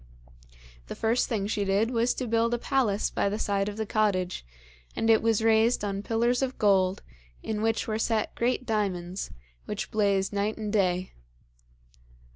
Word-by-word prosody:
The - - -6
first 230 +4 +1
thing 215 -5 -1
she 205 0 -1
did 200 +4 +1
was 235 0 +1
to 255 - -3
build 230 +1 +1
a - - -2
palace 240 -5 0
by 200 - 0
the 205 - -2
side 200 -1 0
of 205 - -8
the 220 - -2
cottage, 200 -4 0 0.5
and 225 0 +2
it 220 - +5
was 225 -1 +1
raised 225 0 +3
on 200 -1 -2
pillars 235 +4 +1
of 265 -1 -2
gold, 190 -2 +2 0.4
in 215 -1 -3
which 225 0 0
were 215 -1 -1
set 225 -1 0
great 250 +2 -1
diamonds, 195 -5 -2 0.4
which - - -5
blazed 200 -2 +1
night 205 +2 -1
and 215 -1 -4
day. 185 -3 +1
215 Hz, 170 wpm, -27 LUFS, 200-225 Hz, 0.5 s, it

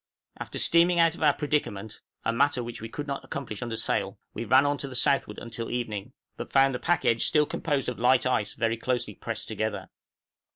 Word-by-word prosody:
After - - -6
steaming 170 +1 +4
out 165 -1 +5
of - - -10
our 150 -2 +4
predicament 140 -9 -2 0.2
(a 115 - +1
matter 130 0 +2
which 120 -1 -7
we 115 - -6
could 145 +5 -5
not 140 -1 -4
accomplish 120 -7 -6
under 120 -1 -3
sail) 100 -2 -1 0.2
we 115 - -4
ran 130 +5 +5
on 145 -1 0
to 140 - -4
the 130 - -7
southward 125 -4 +2
until 115 0 -6
evening, 115 -1 -4 0.2
but - - -7
found 135 0 +4
the 125 - -3
pack 175 -2 +1
edge 115 -1 +3
still 150 -1 +3
composed 145 -3 -2
of 125 - -3
light 125 0 +4
ice 110 -5 0
very 115 0 0
closely 125 +1 -2
pressed 115 -1 -5
together. 110 -1 -3
125 Hz, 210 wpm, -27 LUFS, 115-145 Hz, 0.2 s, out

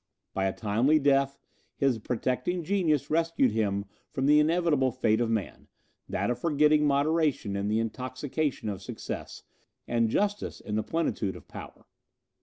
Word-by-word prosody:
By 95 - 0
a 95 - +1
timely 115 +8 +2
death, 140 -1 +2 0.4
his 135 -4 +1
protecting 125 +10 -1
genius 155 -6 +1
rescued 165 -6 +2
him 100 -2 0 0.2
from 135 - -2
the 150 +1 +6
inevitable 155 -4 +2
fate 110 0 +1
of 115 - +1
man 110 -4 -3 0.4
that - - 0
of 120 - -3
forgetting 150 -1 +3
moderation 145 -6 +1
in 100 +1 -1
the 105 +1 +1
intoxication 130 +4 -3
of 100 -2 -4
success, - - -7 0.4
and 115 -1 +1
justice 205 - -1
in 105 - -7
the 110 - +1
plenitude 110 - -1
of - - -12
power. - - -10
135 Hz, 150 wpm, -28 LUFS, 110-155 Hz, 0.4 s, the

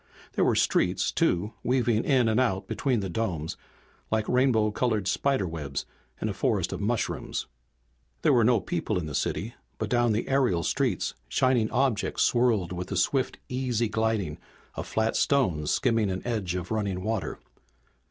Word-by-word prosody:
There - - +2
were - - +3
streets, 90 +1 +2
too, 105 - +1
weaving 120 -3 +1
in 130 -5 +3
and 110 +2 +2
out 105 -6 0
between 125 -6 0
the 95 - -3
domes 85 -5 -2 0.5
like 110 -1 0
rainbow 125 -4 +3
colored 110 -4 0
spider 135 -1 +1
webs 75 -5 -4 0.3
in - - -1
a - - -2
forest - - 0
of - - -5
mushrooms. - - -2 0.8
There - - +5
were 120 - +5
no 115 0 +4
people 90 +4 -2
in 90 - -2
the 75 - -6
city, 110 - -2 0.2
but 110 -1 -3
down 120 -1 +3
the 110 +2 -1
aerial 125 -11 +2
streets - - 0 0.2
shining 130 -4 +2
objects 125 -4 +1
swirled 115 -8 +2
with 90 0 -4
the - - -3
swift 135 -2 +1
easy 125 -3 -1
gliding 110 -7 -1 0.3
of - - -5
flat 110 0 0
stones 90 - +2
skimming 115 -5 +2
an 95 0 -4
edge 105 -7 -2
of 90 +1 -4
running 100 -4 -1
water. 110 -1 -2
110 Hz, 165 wpm, -27 LUFS, 95-125 Hz, 0.8 s, There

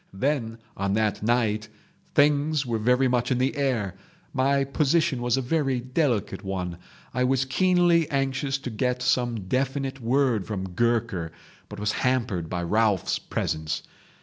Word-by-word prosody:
"Then, 115 0 -1 0.2
on 100 0 -1
that 110 -1 0
night 110 -1 +1 0.5
things 145 0 +3
were 115 -2 -1
very 125 +4 +3
much 125 -1 +1
in 130 - +2
the 130 +2 0
air. 125 -9 0 0.4
My 140 0 +2
position 145 0 +1
was 120 +1 +1
a 135 - -1
very 135 -1 0
delicate 125 - -1
one. 90 -3 -4 0.3
I 125 - +1
was 130 +1 +2
keenly 175 +2 +3
anxious 135 0 0
to 130 -2 -6
get 125 +2 -1
some 120 -3 +1
definite 135 +5 -2
word 120 -4 +1
from 95 -3 -4
Gurker, 110 -4 0 0.4
but - - -8
was 105 +1 0
hampered 115 -10 0
by 90 -1 -2
Ralphs' 105 +1 +1
presence. 80 -1 -3
125 Hz, 150 wpm, -26 LUFS, 105-135 Hz, 0.5 s, things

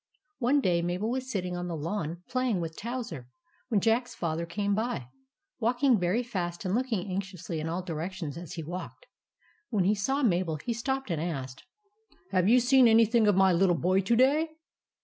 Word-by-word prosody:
One 270 +3 +3
day 175 -7 +2
Mabel 180 +6 -1
was 260 0 -3
sitting 180 -6 -2
on 175 0 -4
the 170 - -3
lawn 170 +1 -4
playing 255 -6 0
with 165 -1 -4
Towser, 225 - -5 0.4
when 225 -6 +2
Jack's 230 +4 +1
Father 170 0 -2
came 200 +3 -1
by, 210 - -2 0.5
walk 245 +4 0
ing 255 -6 +5
very 185 +7 +1
fast 180 -6 -4
and 185 - 0
looking 230 -5 -1
anxiously 185 -3 -4
in 155 +1 -3
all 175 +2 -2
directions 165 -2 -4
as 170 -2 -8
he 165 - -5
walked. 175 +4 -7 0.6
When 205 -5 +1
he 195 +3 +3
saw 265 +8 0
Mabel, 175 -7 +1
he 195 +11 -3
stopped 265 -1 -2
and 160 -2 -1
asked: 135 -6 -5 0.3
— 440 +2 -46
" 180 +2 -31
Have 185 0 +3
you 250 +2 +6
seen 250 +1 +5
anything 225 0 +5
of 205 - +4
my 190 -1 +5
little 175 0 +3
boy 185 +6 +2
to 205 +5 +2
day 285 +6 +3
190 Hz, 195 wpm, -29 LUFS, 175-235 Hz, 0.6 s, you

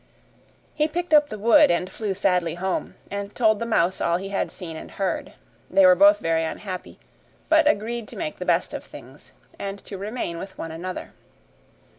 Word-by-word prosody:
He 300 - +1
picked 345 +1 -3
up 295 -1 +6
the 215 - -6
wood, 225 +3 +6
and 175 +1 +1
flew 205 0 -4
sadly 180 -4 +1
home, 185 +1 -3 0.2
and 200 0 -5
told 220 -3 +3
the 230 - -3
mouse 185 -4 +1
all 170 0 +2
he 195 +2 -6
had 200 - -1
seen 165 -3 -8
and - - -8
heard. 195 -1 -3 0.4
They 290 - +5
were 275 - +8
both 300 +2 +6
very 165 - 0
unhappy, 185 +3 -6 0.5
but 315 -1 +5
agreed 230 -1 -1
to - - -11
make 315 -2 -4
the - - -3
best - - +1
of - - -5
things - - -14 0.3
and 200 0 -4
to 195 - -7
remain 200 -5 -4
with 190 - -9
one 165 - -5
another. 180 +3 -6
200 Hz, 190 wpm, -24 LUFS, 180-240 Hz, 0.5 s, were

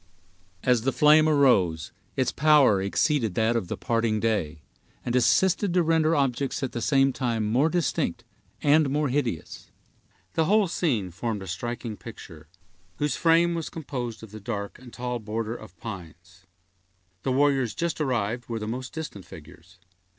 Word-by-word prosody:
As 125 -3 +3
the 135 +4 0
flame 150 +4 +5
arose, 95 - +3 0.2
its 130 -2 +1
power 145 -10 +4
exceeded 110 - 0
that 110 +1 +2
of 115 -6 -1
the - - -4
parting 115 -2 0
day, 85 -9 -1 0.4
and 120 - -1
assisted 180 - +3
to 180 - +4
render 160 0 +2
objects 135 -1 -1
at 130 - -2
the 120 - -4
same 135 0 +3
time 115 -4 -1
more 125 +9 +2
distinct 175 -2 -1 0.4
and 150 0 +4
more 145 +1 0
hideous. 125 - -3 0.6
The 160 - +2
whole 205 +3 +3
scene 120 - -1
formed 105 +2 -4
a - - -9
striking 120 +2 -5
picture, 80 -9 -11 0.5
whose 145 -3 0
frame 170 +1 +3
was 165 -2 -3
composed 125 -8 -6
of 110 - -11
the 110 - -9
dark 100 -2 -5
and 125 -2 -13
tall 125 0 -4
border 110 +1 -3
of 110 -6 -12
pines. 90 -3 -10 0.7
The 135 - -1
warriors 135 -4 +2
just 170 -2 -2
arrived 120 -3 -1
were 115 - -2
the 105 -1 -5
most 125 +3 -5
distant 150 - -7
figures. 80 +3 -14
120 Hz, 160 wpm, -26 LUFS, 105-145 Hz, 0.7 s, flame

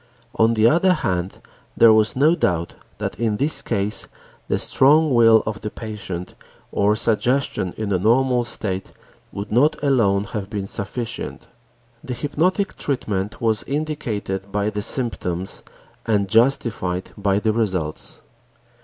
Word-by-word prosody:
On 115 +1 +3
the 110 0 +4
other 175 +7 +4
hand, 90 - -2 0.4
there 115 -1 +7
was 110 0 +2
no 150 +5 +4
doubt 85 - 0 0.2
that - - -4
in 110 -3 0
this 150 +5 +1
case 105 -2 -1 0.4
the - - +1
strong 150 +2 +4
will 115 -2 +6
of 110 0 -4
the 105 - -4
patient 105 -6 -6 0.4
or 105 +1 +2
suggestion 115 -3 0
in 105 -2 -2
a 90 - +1
normal 125 +4 +3
state 100 -5 -4 0.4
would 100 +1 -6
not 135 +8 +4
alone 110 -8 +3
have 100 -1 -5
been 100 -3 -3
sufficient. 115 +4 -5 0.6
The 125 - -4
hypnotic 165 - 0
treatment 105 -7 -3
was 110 -2 +1
indicated 110 -10 -3
by 105 +1 0
the 105 0 -3
symptoms 95 -7 -3 0.5
and 105 -3 +2
justified 110 -5 +1
by 100 -1 +1
the 110 +1 +1
results. 95 -9 -3
110 Hz, 135 wpm, -21 LUFS, 100-125 Hz, 0.6 s, there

